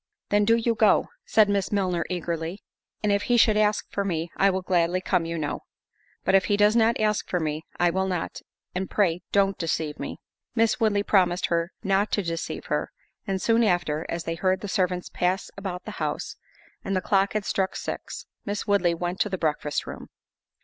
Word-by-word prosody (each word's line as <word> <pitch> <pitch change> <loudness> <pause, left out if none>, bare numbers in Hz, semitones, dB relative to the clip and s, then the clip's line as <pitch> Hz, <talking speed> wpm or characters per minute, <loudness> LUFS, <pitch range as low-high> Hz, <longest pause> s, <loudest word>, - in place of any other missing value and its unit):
"Then 205 0 +3
do 225 +2 +5
you 230 0 +1
go," 215 -1 +3 0.2
said 215 -2 +4
Miss 200 -1 0
Milner, 185 -4 +1
eagerly; 170 +1 -3 0.4
"and 210 - +2
if 200 0 +2
he 245 - +5
should 220 -2 +5
ask 210 0 +2
for 200 - -1
me, 170 -3 -2
I 195 - +4
will 190 -1 -1
gladly 175 0 +2
come, 180 -2 0
you 165 0 -3
know; 150 -2 -2 0.6
but - - +1
if 195 -1 +5
he 205 - +2
does 210 +1 +4
not 230 0 +3
ask 215 -1 0
for 180 - 0
me, 155 -1 -2 0.2
I 175 -1 +4
will 190 +2 0
not—and 180 +1 -5
pray 180 -4 +1
don't 195 -1 +2
deceive 160 -2 -2
me." - - -5 0.4
Miss 225 0 +2
Woodley 210 -3 +2
promised 180 -3 +3
her 170 +1 0
not 195 +1 +1
to 205 - +1
deceive 165 -1 -4
her; - - -1 0.4
and 195 -1 -1
soon 230 +3 +3
after, 175 -6 +1
as 170 0 -3
they 165 - -2
heard 185 +2 0
the 205 - -4
servants 180 -2 0
pass 180 +2 -1
about 190 -2 -5
the - - -5
house, - - -2 0.5
and 195 - -2
the 185 - +1
clock 195 +1 +2
had 215 -2 -1
struck 190 -1 0
six, - - -5 0.2
Miss 205 0 -3
Woodley 195 -5 +2
went 175 +2 -3
to 210 - +2
the 190 - -2
breakfast 150 -3 -1
room. - - -8
190 Hz, 200 wpm, -26 LUFS, 175-205 Hz, 0.6 s, do